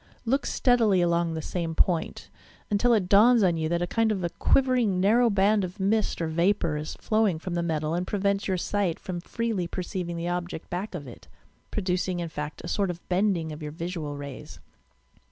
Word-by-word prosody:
Look 270 +5 +1
steadily 230 -7 +3
along 170 -1 +1
the 160 - -4
same 165 -3 -3
point, 170 0 0 0.4
until 210 +4 +3
it 195 -5 0
dawns 220 +4 +6
on 175 -3 +3
you 160 -1 -1
that 170 +1 0
a - - +1
kind 225 +4 +1
of 195 -4 -2
a 175 - 0
quivering, 250 -8 +2
narrow 230 +5 +4
band 205 0 +3
of 185 +3 -6
mist 210 +3 +1
or - - 0
vapour 170 0 +1
is 150 +1 -5
flowing 215 -6 +1
from 175 +2 -5
the 170 - 0
metal 155 -2 -1
and 180 +2 -2
prevents 200 0 0
your 190 -2 0
sight 185 -2 -1
from 185 -4 -5
freely 220 -3 -2
perceiving 180 -1 -4
the 170 +1 -3
object 175 -2 -4
back 185 +3 -4
of 150 -5 -6
it, 120 - -12 0.4
pro 210 - -3
ducing, 180 0 -1
in 170 -1 -3
fact, 150 0 -6
a - - -6
sort 195 +2 0
of 175 -1 -7
bending 180 -4 +1
of 150 +1 -8
your 150 -1 -5
visual 160 -3 -5
rays. 140 -2 -9
180 Hz, 205 wpm, -26 LUFS, 170-205 Hz, 0.4 s, dawns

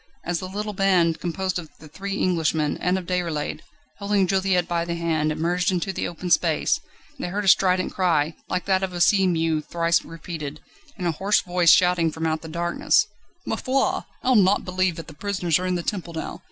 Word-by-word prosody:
As 175 0 -1
the 185 - -6
little 210 +2 -4
band, 185 -4 +2
composed 185 +1 -2
of 160 -3 -9
the 155 - -13
three 195 +6 -5
Englishmen, 160 -4 +1
and 180 +1 0
of 185 - -5
Déroulède, 170 -4 -2 0.4
holding 200 -1 +2
Juliette 190 -2 +1
by 170 -1 0
the 170 0 -3
hand, 160 -2 0
emerged 175 +4 0
into 185 +1 -1
the - - -2
open 175 +1 -6
space, 165 -2 +2 0.4
they - - -3
heard 200 +3 -3
a - - -2
strident 185 -1 +3
cry, 165 -4 +1 0.2
like 180 - -2
that 190 -1 +2
of 190 -1 -3
a 175 - -4
sea 190 +2 +4
mew 165 -3 +1
thrice 170 +1 +1
repeated, 155 -3 -7 0.4
and 180 - -4
a 170 - +2
hoarse 195 +6 +1
voice 175 -1 +2
shouting 180 -2 +5
from 160 +1 -4
out 160 0 0
the 160 - -9
darkness: 170 +5 +1 0.4
"Ma - - -1
foi! 265 +4 0 0.2
I'll 255 0 +3
not 200 -1 +4
believe 185 -1 0
that 165 - -7
the 160 - -11
prisoners 180 -1 0
are 185 - -2
in 180 - 0
the 175 - -2
Temple 175 -4 -4
now! 160 - -5
175 Hz, 205 wpm, -24 LUFS, 165-190 Hz, 0.4 s, shouting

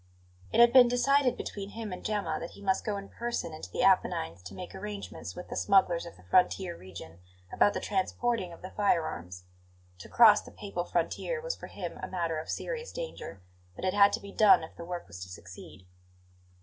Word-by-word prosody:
It - - +1
had 235 0 +7
been 255 -2 +9
decided 250 +2 +3
between 200 -1 -6
him 220 -2 -6
and 180 - -8
Gemma 200 -7 -1
that 170 - -7
he - - -12
must 190 -1 +1
go 210 -2 -2
in 200 0 -7
person 235 -8 -4
into 155 -12 -8
the - - -1
Apennines 85 +2 +2
to 90 - -10
make 180 -1 -8
arrangements 205 +1 -7
with 180 - -9
the - - -5
smugglers 185 -4 +3
of 170 - -12
the 90 - -18
frontier 180 - +2
region 85 - -11 0.3
about 205 - +3
the - - 0
transporting 200 0 -1
of 170 - -13
the 185 - -7
firearms. 90 - -1 0.6
To - - -11
cross 215 -3 +7
the - - -13
Papal 185 -4 -5
frontier 180 - -1
was - - -3
for - - -10
him - - -7
a - - -4
matter 170 -3 -2
of 155 - -8
serious 475 -1 -4
danger; 485 - -7 0.3
but - - -5
it 185 - +1
had 200 0 +6
to - - 0
be 200 - -10
done 205 -6 +6
if 160 - -10
the 170 - -8
work 175 0 -5
was 90 0 -10
to 90 - -7
succeed. 95 +1 -11
190 Hz, 210 wpm, -30 LUFS, 160-215 Hz, 0.6 s, been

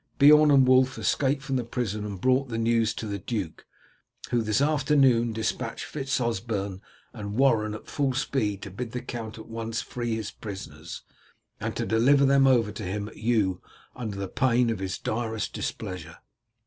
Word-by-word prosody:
Beorn 150 +2 +7
and 135 -2 +6
Wulf 130 +1 +4
escaped 135 0 +1
from 135 - -1
the 125 - -1
prison 110 -3 -3
and 100 -2 -6
brought 130 +4 +2
the 115 - -3
news 115 -1 +2
to - - -5
the 100 -1 -4
duke, 95 -5 -5 0.6
who 120 - +2
this 110 0 +1
afternoon 135 -5 +3
dispatched 110 0 -3
Fitz 135 -3 -2
Osberne 100 -4 -2 0.3
and 105 -3 -6
Warren 110 -5 +3
at 110 - -10
full 140 -3 -1
speed 110 -7 -1
to 100 - -7
bid 115 +4 -6
the 125 - -3
count 115 -2 -6
at 110 - -9
once 115 0 -4
free 120 -2 -3
his 110 -3 -4
prisoners, 85 -6 -8 0.6
and - - -3
deliver 135 +5 +3
them 135 0 +5
over 120 -5 +3
to 105 - -7
him 100 +2 -3
at - - -16
Eu 105 -5 +1 0.3
under 100 -5 -4
pain 120 +2 +2
of 110 - -3
his 95 -1 -3
direst 110 -1 -3
displeasure." 85 -3 -5
115 Hz, 175 wpm, -27 LUFS, 105-130 Hz, 0.6 s, Beorn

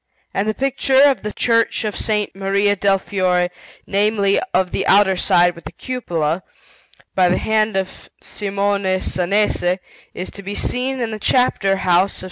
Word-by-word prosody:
And 200 +2 -1
the 215 - -2
picture 270 0 +1
of 280 -3 +4
the 210 - -4
Church 230 0 +1
of 210 - -2
S. 210 0 -1
Maria 200 +1 +1
del 195 0 +2
Fiore 180 -2 0 0.3
namely, 200 0 +1
of 185 0 +1
the - - -2
outer 195 -1 +5
side 175 -1 +3
with 170 - -15
the - - -7
cupola 175 -10 -3 0.7
by 185 -1 +3
the 180 - +2
hand 215 -1 0
of 190 -1 -5
Simone 200 -2 -1
Sanese, 185 -1 0 0.4
is 180 - -5
to 200 - -10
be 200 +1 -6
seen 260 +1 -2
in 230 -2 -2
the 215 - -5
Chapter 210 -4 +2
house 185 0 +2
of - - -7
S. - - -6
200 Hz, 170 wpm, -19 LUFS, 185-215 Hz, 0.7 s, outer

